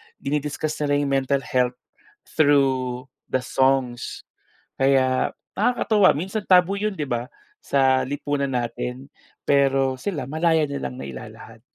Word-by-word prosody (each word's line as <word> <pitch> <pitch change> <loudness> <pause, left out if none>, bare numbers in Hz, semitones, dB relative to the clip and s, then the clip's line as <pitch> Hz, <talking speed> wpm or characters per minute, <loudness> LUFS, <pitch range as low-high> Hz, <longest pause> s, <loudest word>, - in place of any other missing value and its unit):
dini-discuss 150 - -3
nila 145 -1 +1
'yong 145 -1 0
mental 135 0 +1
health, 125 -1 0 0.5
through 135 -4 +1 0.2
the 130 - -1
songs. 130 -3 0 0.6
Kaya, 130 -1 +2 0.2
nakakatuwa, 215 -5 +3
minsan 190 +7 -4
taboo 185 +2 +4
'yon 210 -1 -1
'di 155 - -3
ba? 120 0 -2 0.4
Sa, 130 -1 +3
lipunan 140 0 -2
natin. 125 +2 -4 0.4
Pero 135 -1 +3
sila, 165 -7 -3
malaya 160 +1 +2
nilang 140 -2 -4
nailalahad. 110 -1 -10
140 Hz, 115 wpm, -23 LUFS, 130-150 Hz, 0.6 s, taboo